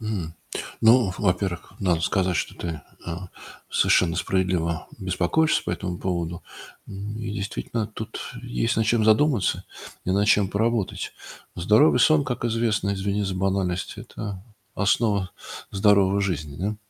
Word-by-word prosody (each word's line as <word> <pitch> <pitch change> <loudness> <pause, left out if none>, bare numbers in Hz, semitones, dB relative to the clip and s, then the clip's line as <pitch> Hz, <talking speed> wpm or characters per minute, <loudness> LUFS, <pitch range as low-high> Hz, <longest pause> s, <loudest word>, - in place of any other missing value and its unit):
М, 100 -8 -3 0.5
ну, 115 -3 +5
во-первых, 90 -2 -1
надо 90 -4 +2
сказать, 90 0 +1
что - - -2
ты, 80 -4 -5 0.3
э, - - -3 0.6
совершенно 85 -2 +3
справедливо 90 -3 0
беспокоишься 95 - +1
по - - -2
этому 90 0 -3
поводу. 85 -2 -3 0.4
Ну 100 +2 -6
и 110 -1 -4
действительно, 105 +2 -3
тут 110 +1 -7 0.2
есть 120 -1 -1
над 110 - +2
чем 110 -1 +3
задуматься 110 +2 +3 0.4
и - - -1
над 100 +2 +2
чем 105 -2 +4
поработать. 110 0 -1 0.4
Здоровый 110 - +4
сон, 155 +2 +5
как 125 -2 -3
известно, 110 -3 +1
извини 100 +1 -1
за 95 -1 -2
банальность- 95 -1 -1
это 100 -3 -7 0.3
основа 100 -2 +1 0.4
здоровой 100 -1 +4
жизни, 80 -7 -2
да. 100 +6 -2
100 Hz, 135 wpm, -25 LUFS, 90-110 Hz, 0.6 s, ну